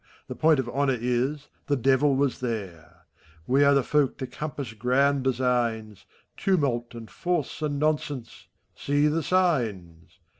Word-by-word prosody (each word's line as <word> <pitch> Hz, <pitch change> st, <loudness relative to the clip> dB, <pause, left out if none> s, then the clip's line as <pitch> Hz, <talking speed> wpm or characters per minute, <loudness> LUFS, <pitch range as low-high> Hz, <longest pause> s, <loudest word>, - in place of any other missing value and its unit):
The -, -, -5 dB
point 155 Hz, -2 st, +3 dB
ot 130 Hz, -, -2 dB
honor 135 Hz, -1 st, +1 dB
is, 125 Hz, +5 st, -1 dB, 0.2 s
the 145 Hz, -, +2 dB
Devil 135 Hz, +2 st, +3 dB
was 140 Hz, -1 st, 0 dB
there! 90 Hz, -8 st, -6 dB, 0.4 s
We 135 Hz, +6 st, +3 dB
are 140 Hz, 0 st, +5 dB
the 140 Hz, -, +3 dB
folk 145 Hz, -1 st, +1 dB
to 135 Hz, -, -4 dB
eompiass 140 Hz, -4 st, -6 dB
grand 135 Hz, +4 st, +2 dB
designs: 120 Hz, -5 st, -1 dB, 0.3 s
Tumulty 125 Hz, -11 st, 0 dB
and 115 Hz, -1 st, -9 dB
Force, 175 Hz, -3 st, -3 dB
and 145 Hz, -2 st, -1 dB
Nonsense! 150 Hz, -4 st, -2 dB, 0.3 s
See 145 Hz, +1 st, 0 dB
the 155 Hz, +2 st, +1 dB
signs! 115 Hz, -, -1 dB
135 Hz, 145 wpm, -26 LUFS, 120-145 Hz, 0.4 s, are